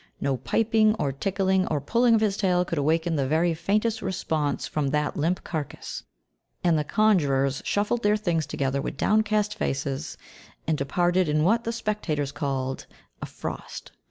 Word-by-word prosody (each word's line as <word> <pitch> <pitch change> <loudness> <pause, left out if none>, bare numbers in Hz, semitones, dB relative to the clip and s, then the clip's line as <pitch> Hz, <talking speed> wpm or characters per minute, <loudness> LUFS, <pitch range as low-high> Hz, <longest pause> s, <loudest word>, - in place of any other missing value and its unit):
No 135 -2 0
piping 215 - +2
or 140 -10 -1
tickling 190 +5 0
or 150 - 0
pulling 230 - +3
of 220 - +2
his 210 -3 +1
tail 180 -3 +2
could 170 -3 -2
awaken 160 +3 +1
the 135 -2 0
very 165 +4 +2
faintest 210 +7 0
response 160 -6 -1
from 150 -2 -1
that 150 +1 0
limp 165 +4 0
carcass, 155 -4 -5 0.6
and 170 -2 +4
the 150 - +1
conjurers 145 -9 +2
shuffled 210 +3 0
their 210 0 +3
things 170 -7 -1
together 140 0 -1
with - - -5
downcast 215 0 +2
faces, 140 -6 -3 0.5
and 160 - +1
departed 175 +5 +1
in 150 0 +2
what 230 +7 +2
the 230 - 0
spectators 205 -11 -2
called 135 -2 -3 0.3
"a - - -4
frost." - - -7
170 Hz, 160 wpm, -26 LUFS, 145-210 Hz, 0.6 s, and